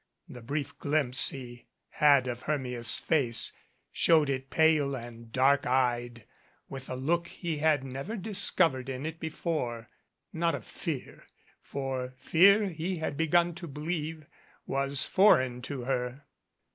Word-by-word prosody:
The 125 - -11
brief 145 +4 -4
glimpse 140 -3 +2
he 120 -3 -10 0.2
had 140 -3 +4
of 120 -1 -4
Hermia's 125 -5 0
face 135 -8 +1 0.4
showed 155 -4 +3
it 135 0 -4
pale 155 -3 +3
and 115 -2 -10
dark 135 +3 +3
eyed 120 -2 0 0.4
with 135 -1 -8
a 130 - -3
look 170 +7 -1
he 170 -4 -4
had 150 -3 +2
never 135 - -6
discovered 185 - +1
in 135 +2 -5
it 160 +1 -5
be 160 - -4
fore, 125 -9 -3 0.4
not 165 0 0
of - - -8
fear, 150 -6 -6 0.3
for 130 -2 -5
fear 200 +9 +5
he 170 +2 -3
had 160 -2 -3
begun 170 +3 +2
to 170 +1 -8
believe 155 +1 -4 0.4
was 135 0 +2
foreign 130 -11 +4
to 135 0 -5
her. 125 +1 -3
140 Hz, 140 wpm, -29 LUFS, 130-160 Hz, 0.4 s, fear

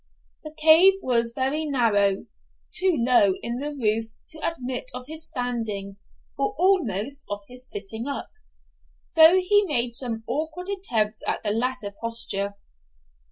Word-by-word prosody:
The 310 0 -10
cave 320 +5 +7
was 235 -2 +1
very 270 +4 -1
narrow, 215 -9 +1 0.5
too 370 -2 +4
low 235 -6 +4
in 235 +1 -3
the 290 +2 -3
roof 225 -6 +1 0.2
to 315 - -1
admit 255 -6 -2
of 250 0 -7
his 315 +3 -5
standing, 225 -6 -4 0.4
or 135 - -1
almost 285 - +1
of 205 0 -4
his 250 +1 -7
sitting 220 +4 -6
up, 280 - -4 0.8
though 320 +2 +8
he 400 +3 +3
made 245 -6 0
some 230 -2 -4
awkward 320 - -4
attempts 230 - -1
at - - -2
the 210 - 0
latter 225 -2 -2
posture. 205 -3 +2
250 Hz, 140 wpm, -24 LUFS, 220-310 Hz, 0.8 s, though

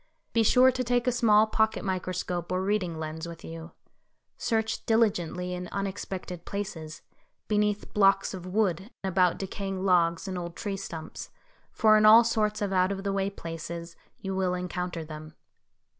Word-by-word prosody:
Be 230 - +3
sure 255 +4 +6
to 255 0 -2
take 245 0 +1
a 250 - +3
small 220 -3 +5
pocket 220 -1 0
microscope 180 -2 -3
or 185 +1 0
reading 190 -5 -1
lens 160 +1 -5
with 170 -1 -9
you. 165 +1 -8 0.6
Search 220 -1 -1
diligently 180 -6 +1
in 180 0 -5
unexpected 190 -3 -5
places, 175 -7 -6 0.4
beneath 210 -1 0
blocks 195 -1 +3
of 185 -1 -7
wood, 190 0 0
about 185 -2 +2
decaying 195 0 -4
logs 170 -1 +2
and 185 -1 -3
old 170 -1 -6
tree 205 -2 -3
stumps, 165 -5 -7 0.4
for 215 -1 +5
in 215 - +4
all 225 +2 +9
sorts 215 -2 0
of 195 -1 -1
out 185 +1 +3
of 195 0 -4
the 200 -1 -1
way 195 0 0
places 170 -2 -7 0.2
you 195 0 -5
will 185 -1 0
encounter 180 -2 -4
them. 155 0 -9
190 Hz, 160 wpm, -28 LUFS, 175-210 Hz, 0.6 s, all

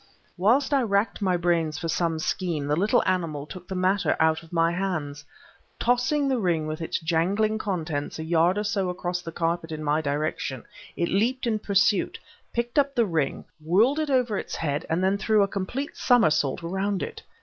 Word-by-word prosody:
Whilst 245 +10 +2
I 275 - +4
racked 205 -1 0
my 185 -3 +2
brains 165 -3 0
for 170 -1 -4
some 165 0 0
scheme, 160 -2 -2
the 145 +1 +1
little 200 +6 +2
animal 165 -6 -1
took 180 +3 -10
the 190 - -5
matter 190 +2 +2
out 160 0 +3
of 165 - -17
my 165 -1 +2
hands. 160 -6 -3 0.5
Tossing 250 +4 +1
the 260 -2 +1
ring 170 -6 0
with 155 +1 -4
its 165 - -2
jangling 190 +7 +1
contents 160 -8 -3
a 160 - -4
yard 170 +3 +2
or 210 - 0
so 200 -3 -1
across 180 0 -3
the 165 - -7
carpet 165 0 -2
in 155 -1 -5
my 150 +1 +1
direction, 145 -3 -2 0.3
it 170 - -1
leaped 240 +7 +1
in 220 -2 0
pursuit, 205 0 +2 0.3
picked 240 +3 0
up 280 -1 +1
the 235 -2 +3
ring, 160 -7 -1 0.2
whirled 220 - +3
it 310 -1 -1
over 245 -6 +1
its - - -5
head, 145 -1 -2
and 165 +3 0
then 195 +1 +2
threw 215 0 +3
a - - +1
complete 200 +9 -4
somersault 160 - +2
around 190 +3 -1
it. - - -6
180 Hz, 195 wpm, -25 LUFS, 160-215 Hz, 0.5 s, I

